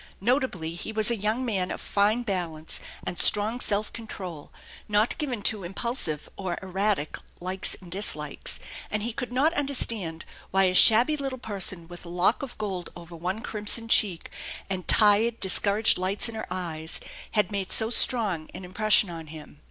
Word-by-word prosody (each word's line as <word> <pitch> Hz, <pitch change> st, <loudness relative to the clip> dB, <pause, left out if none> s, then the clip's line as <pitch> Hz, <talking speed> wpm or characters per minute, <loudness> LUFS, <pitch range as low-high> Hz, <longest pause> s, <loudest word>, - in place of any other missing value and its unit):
Notably 205 Hz, -, -1 dB
he 175 Hz, +5 st, -5 dB
was 220 Hz, +1 st, +2 dB
a -, -, +1 dB
young 220 Hz, +4 st, -1 dB
man 195 Hz, -6 st, -1 dB
of -, -, -5 dB
fine 210 Hz, +4 st, +1 dB
balance 170 Hz, -7 st, -3 dB, 0.3 s
and 175 Hz, -, -5 dB
strong 215 Hz, +3 st, +4 dB
self 210 Hz, -2 st, -1 dB
control, 185 Hz, -9 st, -8 dB, 0.4 s
not 210 Hz, +2 st, +2 dB
given 250 Hz, -8 st, -3 dB
to 210 Hz, -2 st, +3 dB
impulsive 185 Hz, -, -2 dB
or 185 Hz, -3 st, -4 dB
erratic 190 Hz, -3 st, -1 dB, 0.2 s
likes 185 Hz, +2 st, -3 dB
and 180 Hz, -2 st, -14 dB
dislikes; 200 Hz, +4 st, -3 dB, 0.3 s
and 210 Hz, -1 st, -2 dB
he 235 Hz, 0 st, -3 dB
could 245 Hz, +1 st, -5 dB
not 285 Hz, +6 st, +2 dB
understand 230 Hz, -, -1 dB, 0.2 s
why 195 Hz, 0 st, +3 dB
a 185 Hz, -1 st, +2 dB
shabby 235 Hz, +10 st, +8 dB
little 270 Hz, -2 st, -4 dB
person 190 Hz, -7 st, -1 dB
with 175 Hz, 0 st, -11 dB
a 170 Hz, -, -10 dB
lock 180 Hz, +6 st, +1 dB
of 275 Hz, -3 st, -7 dB
gold 190 Hz, -5 st, -4 dB
over 170 Hz, 0 st, -11 dB
one 180 Hz, +6 st, -4 dB
crimson 220 Hz, 0 st, +1 dB
cheek, 195 Hz, -7 st, +2 dB, 0.4 s
and 185 Hz, -2 st, -4 dB
tired, 220 Hz, +2 st, +4 dB
discouraged 200 Hz, +2 st, +3 dB
lights 190 Hz, +5 st, 0 dB
in 230 Hz, -, -5 dB
her 220 Hz, -, -6 dB
had 175 Hz, +4 st, -4 dB
made 200 Hz, -2 st, -3 dB
so 220 Hz, 0 st, +4 dB
strong 210 Hz, -11 st, +1 dB
an 180 Hz, +1 st, -8 dB
impression 210 Hz, +3 st, +3 dB
upon 165 Hz, -2 st, -8 dB
him. 150 Hz, -1 st, -12 dB
200 Hz, 165 wpm, -26 LUFS, 180-225 Hz, 0.4 s, shabby